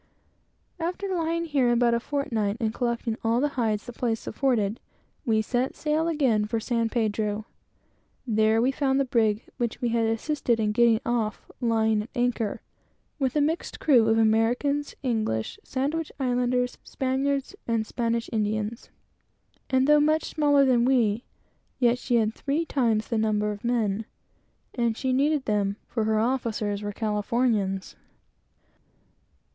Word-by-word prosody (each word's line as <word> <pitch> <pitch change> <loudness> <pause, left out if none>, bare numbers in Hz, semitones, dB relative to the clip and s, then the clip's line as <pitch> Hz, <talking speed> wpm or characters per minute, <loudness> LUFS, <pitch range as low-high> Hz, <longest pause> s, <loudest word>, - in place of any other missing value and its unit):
After 360 +4 -3
lying 335 -1 -1
here 275 -6 +2
about 240 0 +3
a 235 - +2
fortnight, 230 -6 -1
and 220 -2 -1
collecting 235 -2 -2
all 230 +1 +2
the 290 +3 +1
hides 225 -6 -1
the 245 - -8
place 230 -2 -2
afforded, 225 -4 0 0.5
we 220 -1 +3
set 245 +4 -1
sail 310 +2 0
again 260 -10 +2
for 225 +2 -1
San 230 0 0
Pedro. 215 -2 -1 0.8
There 220 -1 +3
we 260 - +3
found 270 0 +1
the 275 - +2
brig 225 -3 +1
which 235 -2 -2
we 240 - 0
had 230 -1 +1
assisted 235 +1 0
in 210 -1 +1
getting 230 0 +4
off 230 -3 -2
lying 220 -2 +2
at 215 - -9
anchor, 240 -4 -1 0.6
with 265 -1 0
a 300 - +3
mixed 320 +4 -1
crew 245 -7 +4
of 225 0 +3
Americans, 235 +6 +1
English, 215 - -1
Sandwich 295 +5 -2
Islanders, 250 -1 0
Spaniards, 275 +5 -1
and 230 -2 0
Spanish 230 0 -1
Indians; 215 +1 -2 0.8
and, 260 0 +3
though 300 0 +6
much 310 +1 +2
smaller 290 -2 +3
than 245 -3 +3
we, 240 -3 +2 0.5
yet 245 -1 +3
she 245 - 0
had 220 -2 +2
three 295 +7 -1
times 230 -8 +1
the 230 - 0
number 210 -1 +1
of 205 -1 -8
men; 225 -3 0 0.7
and 235 -2 0
she 260 -2 0
needed 285 +1 +2
them, 200 -2 0
for 225 -3 -2
her 220 0 +2
officers 220 -4 -1
were 205 0 -3
Californians. 210 -2 -1
235 Hz, 150 wpm, -26 LUFS, 220-265 Hz, 0.8 s, though